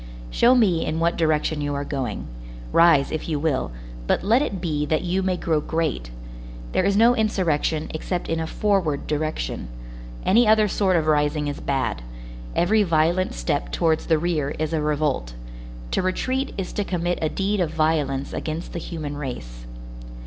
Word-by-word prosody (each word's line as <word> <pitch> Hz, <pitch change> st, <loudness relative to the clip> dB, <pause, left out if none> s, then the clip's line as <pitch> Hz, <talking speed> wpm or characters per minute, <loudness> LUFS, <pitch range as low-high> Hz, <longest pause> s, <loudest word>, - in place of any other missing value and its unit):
Show 245 Hz, +2 st, +5 dB
me 190 Hz, -9 st, +3 dB
in 155 Hz, +1 st, -2 dB
what 170 Hz, +1 st, +2 dB
direction 155 Hz, -1 st, +1 dB
you 145 Hz, 0 st, -2 dB
are 140 Hz, 0 st, -3 dB
going. 130 Hz, -7 st, -3 dB, 0.5 s
Rise, 165 Hz, -5 st, +5 dB
if 155 Hz, +1 st, -4 dB
you 155 Hz, -, 0 dB
will, 145 Hz, -, -1 dB, 0.4 s
but -, -, +1 dB
let 225 Hz, +7 st, +4 dB
it 200 Hz, -10 st, -2 dB
be 155 Hz, -4 st, -1 dB
that 155 Hz, +3 st, +1 dB
you 180 Hz, +2 st, 0 dB
may 185 Hz, -1 st, 0 dB
grow 160 Hz, -4 st, 0 dB
great. 155 Hz, -, -2 dB, 0.6 s
There -, -, +1 dB
is 200 Hz, 0 st, +2 dB
no 235 Hz, +3 st, +6 dB
insurrection 170 Hz, -8 st, 0 dB
except 175 Hz, +3 st, -3 dB
in 165 Hz, 0 st, -1 dB
a 160 Hz, -, -2 dB
forward 190 Hz, -8 st, 0 dB
direction. 150 Hz, -, -2 dB, 0.6 s
Any 230 Hz, +4 st, +5 dB
other 215 Hz, 0 st, +5 dB
sort 190 Hz, -2 st, +1 dB
of 160 Hz, -2 st, +2 dB
rising 150 Hz, 0 st, +1 dB
is 145 Hz, -, -4 dB
bad; 135 Hz, -, -1 dB, 0.5 s
every 215 Hz, +5 st, +3 dB
violent 170 Hz, 0 st, +2 dB
step -, -, -2 dB
towards 160 Hz, -, +1 dB
the 160 Hz, -, +4 dB
rear 155 Hz, -4 st, -1 dB
is 155 Hz, +1 st, -2 dB
a 160 Hz, -, +1 dB
revolt; 150 Hz, -, -1 dB, 0.6 s
to -, -, +1 dB
retreat 255 Hz, +9 st, -1 dB
is 190 Hz, -2 st, -4 dB
to 205 Hz, -, -1 dB
commit 175 Hz, -2 st, -1 dB
a 155 Hz, -, +1 dB
deed 200 Hz, +3 st, -1 dB
of 175 Hz, -4 st, +1 dB
violence 155 Hz, -4 st, 0 dB
against 160 Hz, +2 st, -4 dB
the 170 Hz, -, -3 dB
human 155 Hz, -4 st, -5 dB
race. -, -, -7 dB
160 Hz, 175 wpm, -23 LUFS, 150-185 Hz, 0.6 s, no